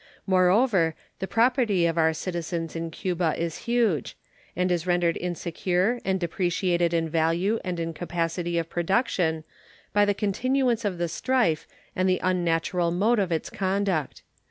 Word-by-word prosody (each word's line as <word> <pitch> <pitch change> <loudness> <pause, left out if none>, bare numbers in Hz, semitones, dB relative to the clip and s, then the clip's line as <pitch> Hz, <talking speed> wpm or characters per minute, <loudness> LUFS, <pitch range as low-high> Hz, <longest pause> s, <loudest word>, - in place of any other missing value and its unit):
Moreover, 185 -2 +3 0.2
the 190 - -3
property 230 -6 +2
of 165 -1 +1
our 160 -1 +3
citizens 170 0 -4
in 165 0 -3
Cuba 175 0 -1
is 170 +7 -4
large, 230 - +1 0.4
and 180 +1 +1
is 175 0 -1
rendered 175 -1 +2
insecure 180 +5 -1
and 190 0 0
depreciated 175 0 0
in 165 -1 +1
value 165 +7 +1
and 180 -2 -3
in 165 0 -3
capacity 170 +1 -2
of 165 -1 -1
production 175 -3 0 0.5
by 205 0 +4
the 205 0 +1
continuance 235 +3 0
of 190 -3 -1
the 175 0 -1
strife 170 - 0 0.3
and 185 0 +1
the 185 - +2
unnatural 175 -1 +1
mode 210 +7 +2
of 190 -3 0
its 160 - -2
conduct. 190 -5 -1
180 Hz, 150 wpm, -26 LUFS, 165-200 Hz, 0.5 s, by